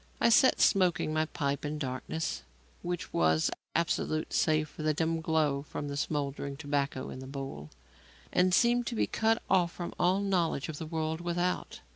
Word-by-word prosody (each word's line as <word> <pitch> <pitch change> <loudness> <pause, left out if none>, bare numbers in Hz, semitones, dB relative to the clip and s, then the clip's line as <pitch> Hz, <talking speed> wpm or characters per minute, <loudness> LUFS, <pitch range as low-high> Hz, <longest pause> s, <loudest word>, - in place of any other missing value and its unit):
I - - +4
sat 255 +3 +5
smoking 180 -6 +3
my 155 0 +2
pipe 140 -2 -2
in 150 +1 -3
darkness 135 +3 -3 0.4
which 175 -1 -4
was 80 -1 +3 0.2
absolute 160 -2 0
save 155 -1 +2
for 155 - -10
the 155 -1 +1
dim 165 +1 0
glow 155 -4 +1
from 145 0 -6
the 140 - -4
smouldering 140 -1 -2
tobacco 145 -3 -2
in - - -7
the 130 - -8
bowl, 135 - -6 0.6
and 180 +1 +4
seemed 240 +4 +3
to 240 - -2
be - - +2
cut 225 +1 +1
off 180 -3 +3
from 175 - -5
all 185 +2 +3
knowledge 175 -7 0
of 150 - -5
the 160 - -5
world 160 0 -2
without. 175 +1 -2
155 Hz, 175 wpm, -30 LUFS, 140-175 Hz, 0.6 s, sat